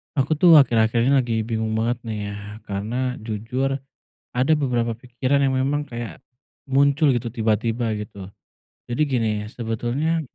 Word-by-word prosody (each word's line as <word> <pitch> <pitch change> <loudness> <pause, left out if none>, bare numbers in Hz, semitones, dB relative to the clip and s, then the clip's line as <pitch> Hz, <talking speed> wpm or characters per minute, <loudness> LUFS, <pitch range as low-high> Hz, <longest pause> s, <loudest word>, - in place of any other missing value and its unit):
Aku 135 +2 0
tuh 170 -1 +8
akhir-akhir 115 -4 +4
ini 135 - +3
lagi 130 -4 +2
bingung 110 -1 -2
banget 115 +2 0
nih 110 -2 -3
ya, - - -6 0.3
karena 120 +6 -3
jujur, 115 +5 -2 0.6
ada 130 +5 +1
beberapa 120 -5 0
pikiran 130 +4 0
yang 135 -1 +2
memang 145 +2 0
kayak 120 -2 -7 0.5
muncul 140 +2 +4
gitu 120 -1 -1
tiba-tiba, 115 0 0
gitu. 100 -3 -8 0.5
Jadi 120 +5 -2
gini, 115 -5 +1 0.2
sebetulnya 120 +8 -1
120 Hz, 140 wpm, -23 LUFS, 110-135 Hz, 0.6 s, tuh